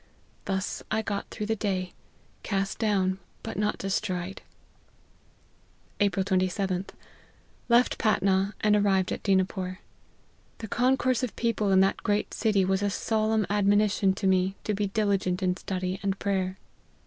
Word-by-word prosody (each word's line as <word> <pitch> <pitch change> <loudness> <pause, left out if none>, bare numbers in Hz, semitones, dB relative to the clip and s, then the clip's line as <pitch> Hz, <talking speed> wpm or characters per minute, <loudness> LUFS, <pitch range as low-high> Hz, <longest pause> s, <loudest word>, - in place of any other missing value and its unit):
Thus 190 -1 -2
I 220 0 0
got 200 -2 -3
through 210 - -4
the 225 +1 0
day, 190 -4 -2 0.5
cast 195 -1 -2
down, 190 -4 +1 0.2
but - - -5
not 210 +1 0
destroyed." 190 -1 -3 0.8
" - - -35
April 200 -2 +2
27th. 185 0 0 0.8
Left 240 +1 +4
Patna 195 -2 +2
and 210 -1 +4
arrived 195 -2 +2
at - - -3
Dina 190 -2 +3
pore. 185 -1 -5 0.8
The 220 - -7
concourse 255 +2 +2
of 250 -4 -3
people 220 -4 0
in 190 0 +6
that 195 - +2
great 205 0 0
city 205 -4 +2
was 190 +1 +1
a 205 - +1
solemn 220 +1 0
admonition 205 -1 +2
to 195 - -4
me 190 0 +2
to 210 - -1
be 205 0 0
diligent 195 -3 0
in 180 -1 +2
study 185 0 -3
and 200 -1 -1
prayer. 190 -2 -1
195 Hz, 150 wpm, -27 LUFS, 190-210 Hz, 0.8 s, in